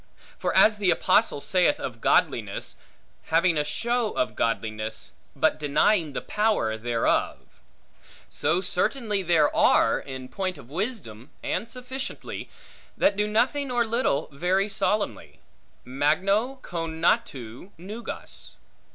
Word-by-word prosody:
For -, -, 0 dB
as 215 Hz, -1 st, +6 dB
the 200 Hz, -3 st, +1 dB
Apostle 185 Hz, -1 st, +3 dB
saith 185 Hz, -, +2 dB
of -, -, -6 dB
godliness, -, -, +1 dB, 0.5 s
Having 165 Hz, 0 st, +2 dB
a -, -, +2 dB
show 230 Hz, +9 st, -1 dB
of 315 Hz, -, -1 dB
godliness, 110 Hz, -1 st, -2 dB, 0.2 s
but 155 Hz, +2 st, +2 dB
denying 150 Hz, +3 st, +2 dB
the -, -, -4 dB
power 210 Hz, -, +1 dB
thereof; 115 Hz, +1 st, 0 dB, 0.9 s
so 155 Hz, +5 st, 0 dB
certainly 205 Hz, +3 st, 0 dB
there 165 Hz, -4 st, +3 dB
are, -, -, +4 dB
in 130 Hz, -1 st, -8 dB
point 185 Hz, +2 st, -3 dB
of 135 Hz, -2 st, -14 dB
wisdom 165 Hz, -, -4 dB
and 225 Hz, -, -2 dB
sufficiency, 255 Hz, +2 st, -6 dB, 0.5 s
that 200 Hz, -, +3 dB
do 210 Hz, +1 st, 0 dB
nothing 260 Hz, +6 st, +1 dB
or 240 Hz, -1 st, +1 dB
little 230 Hz, -, 0 dB
very 180 Hz, +7 st, +1 dB
solemnly: 210 Hz, +1 st, -2 dB, 0.5 s
magno 185 Hz, -, +1 dB
conatu 160 Hz, -, -2 dB
nugas. 205 Hz, +7 st, -8 dB
180 Hz, 115 wpm, -26 LUFS, 145-215 Hz, 0.9 s, as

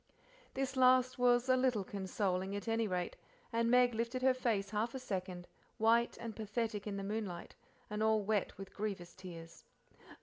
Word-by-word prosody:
This 270 Hz, 0 st, -1 dB
last 255 Hz, -1 st, +4 dB
was 245 Hz, 0 st, +4 dB
a 255 Hz, -, +5 dB
little 255 Hz, -5 st, +2 dB
consoling, 190 Hz, 0 st, -2 dB
at 205 Hz, -, -5 dB
any 225 Hz, 0 st, +1 dB
rate, 180 Hz, -2 st, -2 dB, 0.4 s
and 230 Hz, 0 st, +2 dB
Meg 245 Hz, 0 st, +5 dB
lifted 235 Hz, +3 st, -2 dB
her 260 Hz, 0 st, +5 dB
face 220 Hz, -6 st, -1 dB
half 220 Hz, +4 st, -1 dB
a -, -, -3 dB
second, 185 Hz, -6 st, -4 dB, 0.3 s
white 230 Hz, +1 st, +3 dB
and 230 Hz, -2 st, -6 dB
pathetic 220 Hz, -1 st, -3 dB
in 200 Hz, -1 st, -3 dB
the 195 Hz, -, -4 dB
moonlight, 200 Hz, -4 st, -4 dB, 0.3 s
and 210 Hz, 0 st, -4 dB
all 220 Hz, -1 st, +3 dB
wet 205 Hz, -1 st, 0 dB
with 195 Hz, 0 st, -9 dB
grievous 195 Hz, -5 st, -4 dB
tears. 170 Hz, -3 st, -10 dB
220 Hz, 170 wpm, -35 LUFS, 195-245 Hz, 0.4 s, a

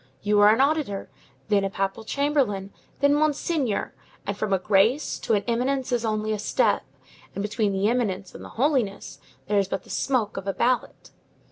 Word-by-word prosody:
you 210 Hz, 0 st, +3 dB
are 205 Hz, 0 st, +7 dB
an 220 Hz, +3 st, +4 dB
auditor, 275 Hz, -, 0 dB, 0.4 s
then 205 Hz, -2 st, +3 dB
a 195 Hz, -, 0 dB
papal 195 Hz, +3 st, -3 dB
chamberlain, 250 Hz, -8 st, 0 dB, 0.3 s
then 285 Hz, 0 st, +5 dB
monsignor, 295 Hz, -5 st, 0 dB, 0.3 s
and 200 Hz, -, -2 dB
from 210 Hz, 0 st, -3 dB
a 195 Hz, -, +4 dB
Grace 210 Hz, +9 st, +2 dB
to 225 Hz, -, +1 dB
an 200 Hz, -, 0 dB
Eminence 255 Hz, +3 st, 0 dB
is 240 Hz, -1 st, +1 dB
only 215 Hz, -1 st, -1 dB
a 210 Hz, -, -3 dB
step, -, -, +1 dB, 0.5 s
and 200 Hz, -, -2 dB
between 210 Hz, 0 st, 0 dB
the 195 Hz, +1 st, +1 dB
Eminence 205 Hz, -6 st, -1 dB
and -, -, -10 dB
the -, -, -9 dB
Holiness 250 Hz, -7 st, 0 dB, 0.3 s
there 205 Hz, 0 st, +2 dB
is 195 Hz, -, 0 dB
but 195 Hz, -1 st, -3 dB
the -, -, -12 dB
smoke 235 Hz, -7 st, 0 dB
of 195 Hz, 0 st, -5 dB
a 195 Hz, -, 0 dB
ballot. 250 Hz, +1 st, -1 dB
215 Hz, 190 wpm, -25 LUFS, 200-260 Hz, 0.5 s, are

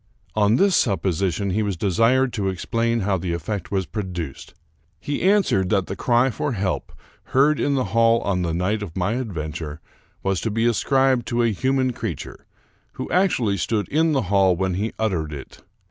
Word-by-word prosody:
On 105 Hz, +1 st, +3 dB
this 195 Hz, +4 st, +3 dB
supposition 95 Hz, -2 st, 0 dB
he 105 Hz, +4 st, 0 dB
was 100 Hz, -4 st, -2 dB
desired 115 Hz, +8 st, +2 dB
to 100 Hz, -3 st, -1 dB
explain 115 Hz, +5 st, -1 dB
how 95 Hz, -1 st, 0 dB
the 85 Hz, 0 st, -3 dB
effect 85 Hz, +3 st, -4 dB
was 95 Hz, -2 st, -1 dB
produced. 90 Hz, -8 st, -6 dB, 0.4 s
He 145 Hz, +8 st, -3 dB
answered 185 Hz, -, +3 dB
that 95 Hz, -2 st, +2 dB
the 95 Hz, -, -5 dB
cry 120 Hz, +4 st, +2 dB
for 140 Hz, +4 st, -2 dB
help, 95 Hz, -4 st, -2 dB, 0.3 s
heard 140 Hz, +3 st, +3 dB
in 140 Hz, -, +1 dB
the 130 Hz, -, +1 dB
hall 115 Hz, 0 st, +4 dB
on 95 Hz, -2 st, -1 dB
th© 85 Hz, -2 st, -1 dB
night 100 Hz, +5 st, 0 dB
of 95 Hz, -3 st, -7 dB
my 95 Hz, +3 st, 0 dB
adventure, 80 Hz, -10 st, -4 dB, 0.4 s
was 95 Hz, -2 st, 0 dB
to 115 Hz, -, -1 dB
be 115 Hz, +2 st, 0 dB
ascribed 130 Hz, +1 st, +2 dB
to 120 Hz, 0 st, +1 dB
a 115 Hz, -, +2 dB
human 130 Hz, +3 st, 0 dB
creature, 100 Hz, -11 st, -6 dB, 0.5 s
who -, -, -6 dB
actually 125 Hz, -, +2 dB
stood 105 Hz, +4 st, -1 dB
in 160 Hz, +1 st, +2 dB
the 135 Hz, -4 st, +1 dB
hall 95 Hz, -1 st, +3 dB
when 95 Hz, +1 st, -1 dB
he 105 Hz, +5 st, -2 dB
uttered 90 Hz, -9 st, -1 dB
it. 70 Hz, -3 st, -9 dB
105 Hz, 180 wpm, -22 LUFS, 95-120 Hz, 0.5 s, hall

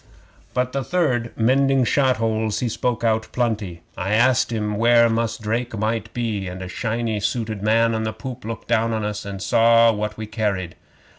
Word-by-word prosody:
But 125 Hz, 0 st, 0 dB
the 135 Hz, 0 st, -2 dB
third, 130 Hz, -9 st, 0 dB
mending 135 Hz, +3 st, +3 dB
shot 130 Hz, 0 st, +2 dB
holes, 110 Hz, -1 st, -1 dB
he 125 Hz, -, -1 dB
spoke 120 Hz, +1 st, -2 dB
out 110 Hz, -1 st, +1 dB
plenty. 105 Hz, -8 st, -2 dB
I 95 Hz, +2 st, -2 dB
asked 125 Hz, +1 st, +3 dB
him 105 Hz, -2 st, -2 dB
where 115 Hz, +1 st, +5 dB
Mus' 115 Hz, 0 st, -1 dB
Drake 115 Hz, +1 st, -3 dB
might 110 Hz, +1 st, -2 dB
be, 110 Hz, -5 st, -2 dB
and 90 Hz, +1 st, -6 dB
a -, -, -6 dB
shiny 115 Hz, +2 st, -2 dB
suited 110 Hz, -1 st, -2 dB
man 115 Hz, +2 st, +3 dB
on 110 Hz, -, -1 dB
the 110 Hz, 0 st, -2 dB
poop 120 Hz, +3 st, -8 dB
looked 115 Hz, +1 st, -6 dB
down 115 Hz, 0 st, +1 dB
into 110 Hz, -1 st, -1 dB
us, 105 Hz, 0 st, -6 dB
and 100 Hz, -1 st, -6 dB
saw 115 Hz, 0 st, +5 dB
what 105 Hz, 0 st, -3 dB
we 110 Hz, -, -5 dB
carried. 105 Hz, -5 st, -2 dB
115 Hz, 190 wpm, -22 LUFS, 105-120 Hz, -, where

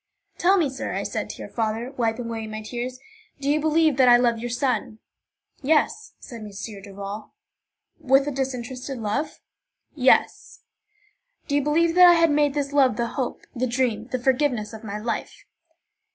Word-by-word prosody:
"Tell 380 Hz, +2 st, +4 dB
me, 330 Hz, -5 st, +2 dB
sir," 265 Hz, 0 st, -5 dB
I -, -, -2 dB
said -, -, -4 dB
to -, -, -7 dB
your -, -, -7 dB
father, 225 Hz, +2 st, -2 dB
wiping 230 Hz, -1 st, -1 dB
away 225 Hz, -1 st, -4 dB
my 215 Hz, 0 st, -6 dB
tears, 245 Hz, +3 st, -5 dB, 0.4 s
"do 275 Hz, -, -4 dB
you 295 Hz, +2 st, +3 dB
believe 315 Hz, -2 st, +2 dB
that 260 Hz, -2 st, +6 dB
I 240 Hz, -, +8 dB
love 240 Hz, -2 st, +1 dB
your 240 Hz, +1 st, -4 dB
son?" 240 Hz, -3 st, -1 dB, 0.6 s
"Yes," 315 Hz, +9 st, +1 dB
said 235 Hz, -2 st, -10 dB
M. 210 Hz, -, -8 dB, 0.3 s
Duval. 200 Hz, +1 st, -8 dB, 0.6 s
"With 270 Hz, +1 st, +3 dB
a -, -, 0 dB
disinterested 260 Hz, 0 st, -4 dB
love?" 230 Hz, +8 st, -3 dB, 0.5 s
"Yes." 260 Hz, -3 st, +2 dB, 0.9 s
"Do 285 Hz, -, -3 dB
you 290 Hz, -, +3 dB
believe 325 Hz, +4 st, +2 dB
that 360 Hz, 0 st, +8 dB
I 350 Hz, -, +8 dB
had 330 Hz, -2 st, +4 dB
made 290 Hz, -1 st, +2 dB
this 285 Hz, -1 st, -2 dB
love 265 Hz, -6 st, +4 dB
the 235 Hz, -1 st, -1 dB
hope, 255 Hz, -3 st, -4 dB
the 255 Hz, +1 st, 0 dB
dream, 235 Hz, -3 st, -1 dB
the 255 Hz, -, -2 dB
forgiveness 250 Hz, -3 st, 0 dB
of 220 Hz, 0 st, -9 dB
my 210 Hz, -1 st, -5 dB
life?" 225 Hz, +1 st, -4 dB
255 Hz, 175 wpm, -24 LUFS, 230-290 Hz, 0.9 s, I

